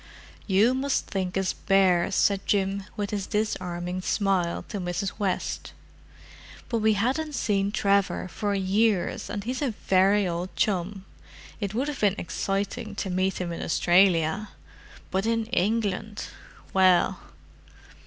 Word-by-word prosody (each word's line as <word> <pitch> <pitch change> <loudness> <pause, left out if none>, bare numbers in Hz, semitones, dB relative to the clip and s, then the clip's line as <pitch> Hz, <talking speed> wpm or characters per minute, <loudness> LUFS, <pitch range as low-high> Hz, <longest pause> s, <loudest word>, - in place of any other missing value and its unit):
"You 210 +5 +4
must 265 +1 0
think 190 -1 -3
us 190 -1 0
bears," 190 -1 +2
said 200 -1 +2
Jim, 195 -1 0
with 205 -1 -2
his 200 -2 -3
disarming 180 -4 -2
smile, 185 -3 0
to 205 - -4
Mrs. 180 +3 -3
West. 195 -3 -2 1.0
"But 230 - 0
we 220 0 +3
hadn't 270 +9 -1
seen 200 -4 0
Trevor 200 -2 +1
for 205 +2 -2
years, 195 0 +1
and 205 -1 -4
he's 250 +5 -3
a 285 - +1 0.2
very 195 +1 +4
old 175 +2 -4
chum. 195 -1 -1 0.5
It 205 -1 -3
would 265 +5 0
have 295 - -4
been 205 -2 +3
exciting 195 +3 -3
to 190 - -3
meet 185 +1 0
him 180 -2 -3
in 170 - -5
Australia; 175 +2 +3 0.6
but 190 +3 0
in 230 -1 +1
England—well!" 205 -3 0
195 Hz, 135 wpm, -26 LUFS, 185-215 Hz, 1.0 s, You